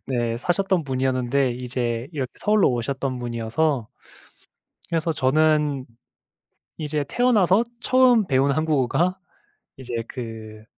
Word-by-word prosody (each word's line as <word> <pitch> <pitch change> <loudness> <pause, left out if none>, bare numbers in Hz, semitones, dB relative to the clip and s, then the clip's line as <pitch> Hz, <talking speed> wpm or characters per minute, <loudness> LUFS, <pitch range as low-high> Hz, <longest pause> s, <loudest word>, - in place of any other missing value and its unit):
네. 120 -3 -1
사셨던 180 +5 0
분이었는데 130 0 0
이제 120 -1 -3
이렇게 135 -5 -3
서울로 210 -5 +3
오셨던 130 +2 -2
분이어서 120 +2 -1 1.0
그래서 165 0 0
저는 150 -1 +2 0.9
이제 150 -1 -2
태어나서 220 - +3 0.2
처음 245 -4 +4
배운 135 +1 +2
한국어가 155 +4 +1 0.6
이제 125 -2 -8
그 110 -3 -8
135 Hz, 255 characters per minute, -23 LUFS, 125-160 Hz, 1.0 s, 처음